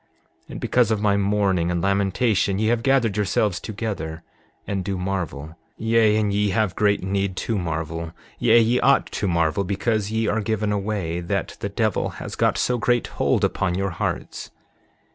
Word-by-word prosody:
7:15 - - -33
And - - -6
because - - +2
of 110 -2 +1
my 105 -1 +2
mourning 100 -3 +1
and 90 -1 0
lamentation 100 +2 +1
ye 110 +2 +1
have 120 -1 +1
gathered 120 -6 +2
yourselves 105 -2 +1
together, 100 -7 -5 0.4
and 95 -2 -2
do 95 0 -3
marvel; 90 -5 -4 0.2
yea, 110 -1 +3
and 105 -2 +1
ye 105 0 +1
have 100 -2 0
great 105 -2 +2
need 95 0 -1
to 115 - -2
marvel; 80 -2 -3 0.3
yea, 120 0 +5
ye 115 +2 +3
ought 140 - +4
to 100 - -2
marvel 85 +2 +1
because 100 +2 -1
ye 110 +1 0
are 110 +2 +1
given 105 -1 -1
away 100 -5 -2
that 95 +3 -3
the 100 - -3
devil 110 0 0
has - - -7
got - - +1
so 125 -1 +1
great 120 +1 +1 0.2
hold - - +2
upon 90 -2 0
your 95 0 -1
hearts. 80 - -4
100 Hz, 180 wpm, -23 LUFS, 90-110 Hz, 0.4 s, yea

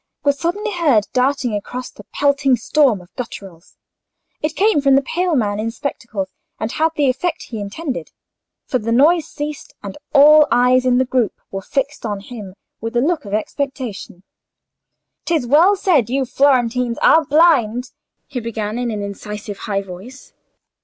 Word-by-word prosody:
was 285 -1 +1
suddenly 410 +6 -2
heard 295 - +2
darting 255 -2 +1
across 245 +5 -5
the - - -14
pelting 280 -2 +2
storm 245 -3 +2
of 180 - -19
gutturals. 195 -8 -9 0.6
It 305 +1 -2
came 405 -5 +3
from 275 -1 +4
the 275 - +3
pale 350 +4 -1
man 210 -5 0
in 225 +1 -1
spectacles, 230 -6 -4 0.3
and 220 +1 -3
had 320 +1 +1
the 290 -2 +2
effect 295 +7 -1
he 225 - -7
intended; 250 +8 -5 0.6
for 255 - -1
the 230 +1 -3
noise 305 +7 +4
ceased, 295 -1 -7
and 200 +5 -7
all 300 +1 +7
eyes 250 +1 +3
in 250 -1 +3
the 260 - +2
group 245 -4 -1
were 195 - -4
fixed 275 +7 -3
on 205 -3 -3
him 205 -3 -10 0.2
with 225 +2 -5
a - - +5
look 310 +1 0
of 200 0 -2
expectation. 240 -6 -4 1.0
"'Tis 320 -7 0
well 325 +11 +5
said 350 - +2
you 265 +1 0
Florentines 250 -2 +1
are 320 - +6
blind," 265 -6 +3 0.3
he 270 -3 -5
began, 220 -1 -4
in 245 -1 -1
an 210 -2 -3
incisive 205 0 -7
high 200 -1 0
voice. 195 +9 -11
255 Hz, 165 wpm, -19 LUFS, 215-290 Hz, 1.0 s, all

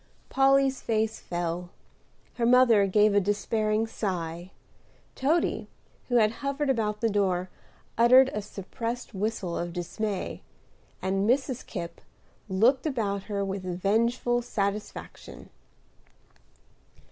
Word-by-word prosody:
Polly's 270 0 +3
face 220 -1 -1
fell; 175 0 -4 0.7
her 235 - +1
mother 240 -5 +5
gave 210 +2 +4
a 205 - +5
despairing 215 +2 0
sigh; 175 -5 -4 0.6
Toady, 310 +6 0 0.4
who 245 - -1
had 215 -2 +5
hovered 280 0 0
about 210 -4 -1
the 230 - +3
door, 185 -3 0 0.5
uttered 255 +3 +7
a 210 - -2
suppressed 230 +5 -6
whistle 195 -3 -2
of 175 0 -3
dismay; 195 +3 -4 0.6
and 195 +2 0
Mrs. 260 -1 +1
Kipp 170 0 -7 0.5
looked 245 +10 +3
about 205 -8 -2
her 200 -1 -1
with 195 0 -3
vengeful 225 +7 0
satisfaction. 205 -2 -5
215 Hz, 110 wpm, -27 LUFS, 195-240 Hz, 0.7 s, uttered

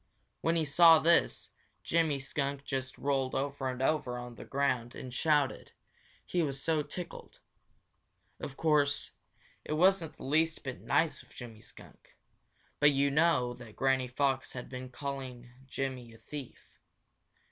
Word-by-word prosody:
When 165 +1 +2
he 160 -2 +2
saw 165 +3 +8
this, 170 +2 +2 0.3
Jimmy 160 -3 +2
Skunk 140 +1 -3
just 130 -2 -3
rolled 135 -2 0
over 140 -1 -1
and 130 0 -3
over 135 -4 +1
on 120 0 -7
the - - -10
ground 130 -4 0
and 125 -1 -7
shouted, 145 0 +1 0.5
he 175 - 0
was 140 -4 -2
so 155 +2 +1
tickled. 165 +4 -8 1.0
Of 135 - -7
course, 150 -3 +2 0.5
it - - -3
wasn't 175 0 +3
the - - -10
least 155 +4 +1
bit 135 -2 -6
nice 165 -2 +1
of - - -20
Jimmy 115 -3 -9
Skunk, - - -15 0.6
but 145 - +7
you 140 0 +2
know 150 -5 +3
that 120 -3 -12
Granny 135 -1 +2
Fox 135 +1 0
had 125 - -7
been 130 0 -7
calling 130 -3 -6 0.2
Jimmy 130 -3 -4
a - - -15
thief. 140 +1 -10
140 Hz, 145 wpm, -31 LUFS, 130-155 Hz, 1.0 s, saw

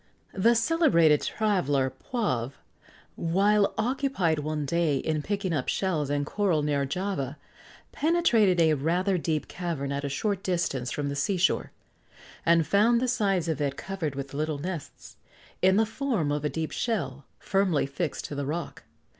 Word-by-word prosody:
The 230 +5 +3
celebrated 230 - +4
traveller 145 -12 0
Poivre, 135 - -2 0.6
while 200 +4 +2
occupied 225 - 0
one 150 0 -2
day 160 -1 +1
in 155 +2 -1
picking 200 +1 -2
up 140 -5 -1
shells 160 -7 0
and 145 0 0
coral 175 -3 0
near 140 -2 0
Java, 155 -4 -3 0.5
penetrated 240 - +3
a 160 -2 +5
rather 175 +6 +1
deep 155 -2 -1
cavern 165 -6 -4
at 140 0 -2
a 140 - -2
short 200 +6 -1
distance 165 -10 -1
from 145 -1 -2
the 140 - -3
sea 180 +7 0
shore, 180 +1 +1 0.8
and 165 -1 +5
found 215 +8 +4
the 255 - 0
sides 195 -8 +1
of 160 -3 -1
it 140 -1 -1
covered 170 -6 -4
with 140 0 -6
little 155 +1 -2
nests, 170 0 -7 0.4
in 190 +1 +5
the 220 +2 +4
form 225 - -1
of 145 0 -1
a 150 - +1
deep 160 0 -3
shell, 140 - -2
firmly 195 -8 +1
fixed 145 +4 -3
to - - -6
the 140 -1 -3
rock. 160 0 -4
170 Hz, 160 wpm, -27 LUFS, 145-200 Hz, 0.8 s, a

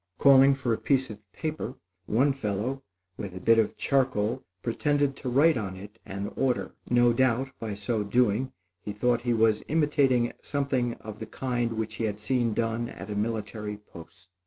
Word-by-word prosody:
Calling 135 0 +7
for 130 -4 -1
a - - -2
piece 130 -3 +1
of 105 -2 -13
paper, 155 0 -4 0.3
one 135 +6 +3
fellow, 125 +2 -2 0.4
with 95 -3 -6
a - - -5
bit 115 +5 +4
of 110 - 0
charcoal, 130 -3 +1 0.2
pretended 145 +3 +1
to 130 - -4
write 145 +5 +4
on 95 -4 -4
it 105 +4 -11
an 100 +1 -5
order. 130 -2 0 0.2
No 120 0 +4
doubt, 130 +2 +1
by 110 -3 -4
so 105 +2 -1
doing, 120 +3 +1 0.3
he 105 +3 -6
thought 120 +2 +1
he 120 0 +1
was 110 -1 +3
imitating 145 -6 +2
something 135 -4 -1
of 110 -1 -10
the 110 - -6
kind 120 -1 -2
which 110 -1 -4
he 115 - -1
had 105 -1 -3
seen 115 0 0
done 115 +1 -1
at - - -8
a - - -3
military 105 -1 -3
post. 90 -3 -14
115 Hz, 180 wpm, -27 LUFS, 105-130 Hz, 0.4 s, Calling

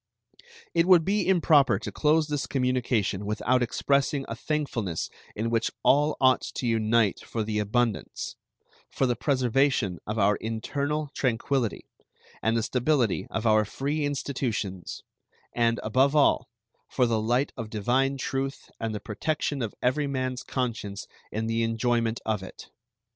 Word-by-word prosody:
It 170 +1 +3
would 175 -4 +6
be 205 +2 +1
improper 160 -6 +4
to - - -6
close 155 +1 +2
this 145 -3 -2
communication 125 -6 0
without 115 +5 +1
expressing 140 +3 +1
a 115 - -4
thankfulness 120 - -2 0.2
in 115 +2 -2
which 115 -1 +1
all 150 +2 +3
ought 130 -1 +4
to - - -3
unite 110 -2 +2
for 115 - -3
the 105 0 -1
abundance; 110 +1 -1 0.5
for 135 - 0
the 125 -1 +1
preservation 130 - +1
of 105 +1 -3
our 100 0 +3
internal 140 +7 -3
tranquillity, 125 -1 -1 0.6
and 110 +1 +1
the 115 - 0
stability 125 -2 +1
of 110 - -3
our 110 -1 +5
free 140 +8 -2
institutions, 125 -10 -3 0.5
and, 115 -1 +2
above 130 +6 +2
all, 140 -4 +3 0.4
for 125 - +2
the 115 -2 +1
light 120 +5 +1
of 115 -4 -6
divine 130 +6 +1
truth 135 +1 -3
and 110 -1 -3
the - - -3
protection 145 +6 -2
of 115 -3 -3
every 140 +4 +1
man's 130 -2 -2
conscience 115 -6 -3 0.3
in 110 +1 -2
the 115 0 0
enjoyment 115 0 0
of 110 -3 0
it. 95 - -11
125 Hz, 145 wpm, -27 LUFS, 110-140 Hz, 0.6 s, would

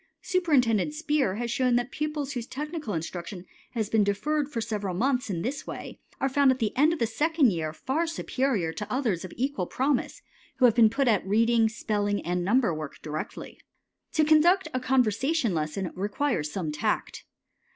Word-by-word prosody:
Superintendent 295 - +2
Speer 300 - 0
has 235 +1 -3
shown 250 0 +2
that 245 +1 0
pupils 300 -2 -3
whose 245 -3 -4
technical 300 - -4
instruction 175 +3 -5 0.3
has 220 -3 -1
been 220 0 +3
deferred 285 +9 0
for 245 - -3
several 210 -5 -3
months 250 +3 0
in 170 -4 -2
this 270 +5 -4
way - - -7 0.2
are 270 - +1
found 275 +1 +3
at 260 - +3
the 220 -4 -1
end 300 +5 +4
of 335 - -1
the 235 - +1
second 290 +3 +2
year 160 -3 -2
far 270 - -2
superior 255 - -1
to 210 - -6
others 230 -10 0
of 185 - -7
equal 255 -8 -1
promise, 270 0 -1 0.3
who 255 - +5
have 235 - +6
been 225 -1 +6
put 270 +4 0
at 215 -4 +3
reading, 225 +3 +3
spelling, 205 -2 -1
and 175 +1 -1
number 225 0 +2
work 155 -2 -6
directly. 155 0 -6 0.5
To 315 - +3
conduct 340 +5 +4
a 255 - 0
conversation 255 - +1
lesson 160 +4 -2
requires 200 - -1
some 165 -4 -3
tact. 150 - -2
235 Hz, 180 wpm, -27 LUFS, 200-280 Hz, 0.5 s, have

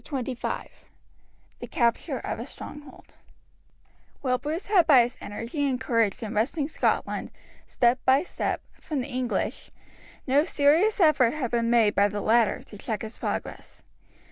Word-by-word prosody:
Chapter 265 -3 -3
XXV 245 - -4 0.9
The - - -7
Capture 235 -2 0
of - - -5
a - - -5
Stronghold 295 -2 -11 1.0
While 255 -2 0
Bruce 315 +5 -4
had 390 -5 +4
by 265 -6 +7
his 240 0 -4
energy 240 +8 -3
and 255 -2 -1
courage 230 -6 +1
been 220 -1 -5
wresting 275 +7 0
Scotland, - - -1 0.4
step 245 +1 +2
by 265 +3 +4
step, - - -3 0.2
from 295 -4 -3
the 250 - -5
English, 255 -2 -2 0.6
no 280 +2 +3
serious 325 +7 +3
effort 300 -7 +4
had 260 -6 -3
been 235 -1 +1
made 230 -3 +4
by 200 +1 +4
the 205 0 -4
latter 225 0 +2
to 205 - -13
check 220 -2 -4
his 220 +1 -8
progress. - - -5
255 Hz, 155 wpm, -26 LUFS, 230-290 Hz, 1.0 s, by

